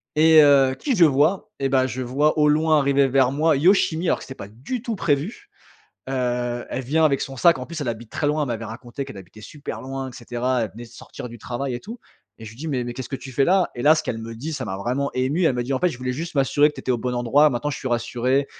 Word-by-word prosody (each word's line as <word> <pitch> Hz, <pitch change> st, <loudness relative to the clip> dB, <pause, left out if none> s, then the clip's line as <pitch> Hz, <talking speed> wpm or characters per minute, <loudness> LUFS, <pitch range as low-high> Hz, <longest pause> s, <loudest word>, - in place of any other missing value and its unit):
et 160 Hz, 0 st, +7 dB
heu, 135 Hz, -2 st, +5 dB
qui 275 Hz, -4 st, 0 dB
je 180 Hz, -, +5 dB
vois? 155 Hz, +6 st, +2 dB
Et 135 Hz, -, 0 dB
bah, 130 Hz, -1 st, +2 dB
je 130 Hz, +1 st, -5 dB
vois 145 Hz, +5 st, +1 dB
au 150 Hz, -, +5 dB
loin 155 Hz, +1 st, +3 dB
arriver 140 Hz, 0 st, +3 dB
vers 130 Hz, -1 st, +3 dB
moi, 155 Hz, +1 st, +2 dB
Yoshimi, 175 Hz, +1 st, +3 dB
alors -, -, +1 dB
que -, -, -10 dB
c'était 130 Hz, -, -9 dB
pas 100 Hz, -, -9 dB
du 130 Hz, -, -6 dB
tout 230 Hz, -2 st, -3 dB
prévu. 170 Hz, -, -2 dB, 0.6 s
Heu, 120 Hz, -2 st, -2 dB
elle 130 Hz, -, -4 dB
vient 155 Hz, +6 st, +2 dB
avec 140 Hz, -3 st, +2 dB
son 135 Hz, -, -5 dB
sac 165 Hz, +2 st, +4 dB
en 125 Hz, -, -6 dB
plus. 170 Hz, -2 st, -7 dB
Elle 135 Hz, -, -3 dB
habite 115 Hz, -1 st, -6 dB
très 145 Hz, -, -2 dB
loin. 150 Hz, +1 st, +1 dB
Elle 145 Hz, -, -2 dB
m'avait 115 Hz, -1 st, -3 dB
raconté 120 Hz, +5 st, -7 dB
qu'elle 110 Hz, -, -10 dB
habitait 95 Hz, +3 st, -14 dB
super 145 Hz, +6 st, -8 dB
loin 135 Hz, 0 st, -5 dB
et -, -, -15 dB
cetera. 120 Hz, +1 st, -2 dB
Elle 110 Hz, -, -3 dB
venait 120 Hz, +3 st, -9 dB
de -, -, -14 dB
sortir 120 Hz, +1 st, -10 dB
du 120 Hz, 0 st, -11 dB
travail 125 Hz, +3 st, -4 dB
et 120 Hz, -, -5 dB
tout 230 Hz, +5 st, -9 dB, 0.4 s
et -, -, -9 dB
je 105 Hz, -, -8 dB
lui 115 Hz, -, -15 dB
dis: 160 Hz, +6 st, -6 dB
«Mais 130 Hz, -4 st, -1 dB
mais 120 Hz, -, -5 dB
qu'est-ce 130 Hz, -, -6 dB
que 135 Hz, -, -4 dB
tu 135 Hz, 0 st, -10 dB
fais 135 Hz, +3 st, +2 dB
là?» 185 Hz, 0 st, +2 dB
et 120 Hz, -, -5 dB
là, 155 Hz, +2 st, +6 dB
ce 155 Hz, -, -1 dB
qu'elle 120 Hz, -7 st, -4 dB
me 115 Hz, +1 st, -7 dB
dit 145 Hz, +8 st, -6 dB
ça 135 Hz, -4 st, -4 dB
m'a 95 Hz, -, -4 dB
vraiment 125 Hz, +7 st, -2 dB
ému. 135 Hz, +8 st, 0 dB
Elle 135 Hz, -, +3 dB
me 120 Hz, -, -1 dB
dit: 125 Hz, +3 st, -3 dB
«En -, -, 0 dB
fait, 180 Hz, -, +2 dB
je 135 Hz, -, -7 dB
voulais 125 Hz, 0 st, -3 dB
juste 165 Hz, +6 st, -6 dB
m'assurer 145 Hz, +1 st, +3 dB
que -, -, -19 dB
tu -, -, -8 dB
étais 130 Hz, -, -1 dB
au 120 Hz, -, -1 dB
bon 125 Hz, +2 st, -3 dB
endroit, 130 Hz, +5 st, +4 dB
maintenant 125 Hz, +3 st, -2 dB
je 140 Hz, -, -5 dB
suis 130 Hz, -, -4 dB
rassurée 125 Hz, +3 st, 0 dB
135 Hz, 295 wpm, -23 LUFS, 120-150 Hz, 0.6 s, et